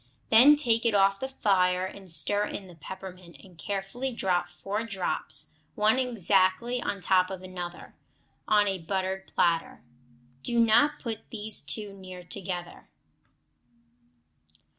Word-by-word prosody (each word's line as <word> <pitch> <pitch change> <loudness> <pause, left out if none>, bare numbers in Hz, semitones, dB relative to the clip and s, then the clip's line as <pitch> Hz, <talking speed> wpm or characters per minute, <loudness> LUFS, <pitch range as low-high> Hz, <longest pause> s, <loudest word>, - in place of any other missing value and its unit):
Then 255 +7 +9
take 235 -6 +1
it 230 -3 +2
off 195 0 +4
the 265 - -3
fire 185 -7 +2
and 190 -1 -8
stir 205 +7 +2
in 200 - -6
the 180 - -13
peppermint, 180 0 -10
and 185 -2 -16
carefully 200 +9 -4
drop 185 -6 0
four 205 +3 -4
drops, 190 -7 -1 0.2
one 215 +4 +3
exactly 230 0 +2
on 200 -4 -3
top 185 0 +3
of 190 -1 -7
another, 180 -1 -7 0.5
on 210 -1 +4
a 195 -1 -1
buttered 190 +2 -3
platter. 165 -1 0 0.6
Do 235 - -1
not 285 +7 +4
put 230 -6 -6
these 215 -1 -5
too 200 +8 -6
near 185 -2 -10
together. 180 -1 -6
195 Hz, 135 wpm, -28 LUFS, 185-220 Hz, 0.6 s, Then